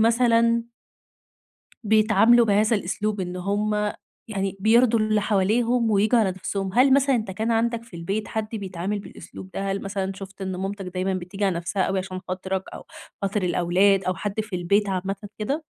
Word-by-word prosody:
مثلًا 230 Hz, 0 st, +3 dB, 1.2 s
بيتعاملوا 220 Hz, +2 st, +5 dB
بهذا 215 Hz, +2 st, +3 dB
الأسلوب. 205 Hz, +2 st, -2 dB
إن 180 Hz, 0 st, -4 dB
هم 210 Hz, +2 st, -1 dB, 0.4 s
يعني 195 Hz, -2 st, -3 dB
بيرضوا 230 Hz, +2 st, +4 dB
اللي 215 Hz, -1 st, +2 dB
حواليهم 225 Hz, +4 st, +1 dB
وبيجّوا 215 Hz, +4 st, +3 dB
على 210 Hz, -4 st, +2 dB
نفسهم. 190 Hz, +1 st, -4 dB
هل 265 Hz, +2 st, +5 dB
مثلًا 275 Hz, -1 st, +4 dB
إن 220 Hz, -, -1 dB
كان 220 Hz, +4 st, -2 dB
عندك 230 Hz, 0 st, 0 dB
في 230 Hz, -6 st, -14 dB
البيت 195 Hz, +6 st, -3 dB
حد 220 Hz, -1 st, -3 dB
بيتعامل 195 Hz, 0 st, -3 dB
بالأسلوب 190 Hz, -1 st, -11 dB
ده؟ 195 Hz, 0 st, -3 dB
هل 195 Hz, -, -2 dB
مثلًا 195 Hz, -1 st, -3 dB
شُفت 195 Hz, 0 st, -10 dB
إن 190 Hz, -, -3 dB
ماماتك 195 Hz, +1 st, -4 dB
دايمًا 185 Hz, +1 st, -2 dB
بتيجي 185 Hz, +2 st, -3 dB
على 190 Hz, -3 st, +1 dB
نفسها 180 Hz, +3 st, -1 dB
أوي 190 Hz, 0 st, 0 dB
عشان 185 Hz, 0 st, -5 dB
خاطرك 190 Hz, +1 st, -3 dB
أو -, -, -9 dB, 0.4 s
خاطر 200 Hz, +1 st, -1 dB
الأولاد 185 Hz, +3 st, +3 dB
أو 185 Hz, 0 st, -1 dB
حد 205 Hz, +4 st, -3 dB
في 210 Hz, -3 st, -6 dB
البيت 200 Hz, +4 st, +1 dB
عامةً 195 Hz, +1 st, -2 dB, 0.2 s
كده؟ 280 Hz, +9 st, -2 dB
200 Hz, 170 wpm, -24 LUFS, 190-220 Hz, 1.2 s, بيتعاملوا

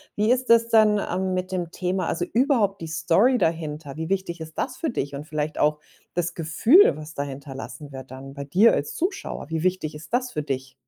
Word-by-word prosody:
Wie 210 Hz, +3 st, +2 dB
ist 255 Hz, 0 st, +1 dB
das 230 Hz, 0 st, +6 dB
denn, 215 Hz, -2 st, +5 dB
ähm, 185 Hz, 0 st, -1 dB
mit 185 Hz, 0 st, -2 dB
dem 175 Hz, -2 st, -3 dB
Thema 185 Hz, -1 st, -2 dB
also 175 Hz, +1 st, -1 dB
überhaupt 225 Hz, -, +1 dB
die 165 Hz, -, -5 dB
Story 170 Hz, +10 st, +3 dB
dahinter? 155 Hz, -, -2 dB
Wie 160 Hz, +1 st, -4 dB
wichtig 185 Hz, -3 st, -2 dB
ist 160 Hz, 0 st, -9 dB
das -, -, -2 dB
für 325 Hz, -, -1 dB
dich 145 Hz, -, -3 dB
und 145 Hz, +2 st, -6 dB
vielleicht 155 Hz, 0 st, -3 dB
auch 150 Hz, 0 st, +2 dB, 0.3 s
das 175 Hz, 0 st, -1 dB
Gefühl, 220 Hz, -, +5 dB
was 155 Hz, 0 st, -9 dB
da 140 Hz, -, -2 dB
hinterlassen 140 Hz, +1 st, -8 dB
wird 130 Hz, -1 st, -9 dB
dann 135 Hz, +1 st, -9 dB
bei 140 Hz, 0 st, -6 dB
dir 190 Hz, +11 st, +5 dB
als 145 Hz, -, -2 dB
Zuschauer. 375 Hz, -, -3 dB
Wie 160 Hz, +1 st, -2 dB
wichtig 180 Hz, -5 st, -1 dB
ist 155 Hz, +9 st, -11 dB
das 250 Hz, 0 st, +1 dB
für 150 Hz, -, -3 dB
dich? 130 Hz, -2 st, -4 dB
165 Hz, 215 wpm, -24 LUFS, 150-210 Hz, 0.3 s, das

